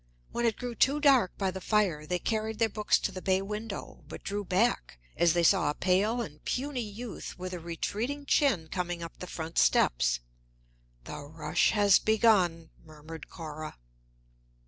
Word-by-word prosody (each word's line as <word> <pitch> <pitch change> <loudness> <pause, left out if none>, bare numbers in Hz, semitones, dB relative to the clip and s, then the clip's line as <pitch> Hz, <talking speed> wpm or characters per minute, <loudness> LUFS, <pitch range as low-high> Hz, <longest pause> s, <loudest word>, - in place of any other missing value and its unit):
When 235 0 0
it 225 - 0
grew 245 -1 -4
too 275 +5 +3
dark 270 - +4
by 195 -2 0
the 190 +1 -7
fire, 180 -8 +1
they 180 - 0
carried 220 +2 -2
their 225 -1 +2
books 210 0 +2
to - - -2
the 185 -1 -7
bay 190 0 +2
window, 210 +1 -6
but - - -9
drew 205 +1 -3
back 185 - 0 0.2
as 170 -2 +3
they 175 -1 +2
saw 170 -3 +4
a 150 - -2
pale 200 +6 +1
and 150 -5 -11
puny 265 0 -2
youth 220 +2 -7
with 185 0 -6
a 180 - -4
retreating 215 - -3
chin 230 - +2
coming 175 -2 -3
up 165 - -9
the 180 - -7
front 165 -1 -3
steps. - - +3 0.8
"The - - -7
rush 155 +2 0
has 205 -3 +5
begun," 200 -7 +2
murmured 155 +1 -11
Cora. 155 -2 -7
190 Hz, 170 wpm, -29 LUFS, 165-220 Hz, 0.8 s, has